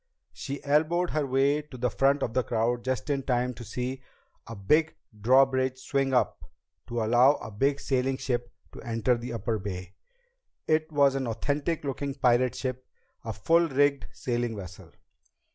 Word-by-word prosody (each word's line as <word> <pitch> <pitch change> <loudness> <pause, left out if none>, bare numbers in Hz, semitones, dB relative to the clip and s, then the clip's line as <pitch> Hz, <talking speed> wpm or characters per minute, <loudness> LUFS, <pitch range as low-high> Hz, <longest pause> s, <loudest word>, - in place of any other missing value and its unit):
She 140 0 -6
elbowed 160 +5 +2
her 150 -2 0
way 135 +3 +2
to 145 -3 -12
the 125 -1 0
front 140 +2 +2
of 115 - -2
the 130 - +2
crowd 120 +1 -1
just 130 +2 -2
in 140 -1 0
time 125 -1 0
to 120 - -10
see 125 +4 -4 0.5
a 115 - -7
big 150 +11 +2 0.3
drawbridge 130 +2 +3
swing 135 +1 -1
up 125 - +1 0.4
to 120 -1 -2
allow 120 +5 +5
a 110 - -8
big 135 +7 +1
sailing 130 -1 0
ship 120 -2 -2 0.2
to - - -11
enter 115 +1 +1
the 120 +1 -6
upper 115 -1 -2
Bay. 95 -2 -6 0.7
It 155 0 +1
was 140 -2 +4
an 135 -2 -2
authentic 145 +8 -2
looking 140 0 -3
pirate 125 -2 +2
ship, 130 -1 -4 0.4
a - - -4
full 165 - +2
rigged 140 0 +2
sailing 120 -2 -2
vessel. 90 -3 -9
130 Hz, 165 wpm, -27 LUFS, 120-140 Hz, 0.7 s, allow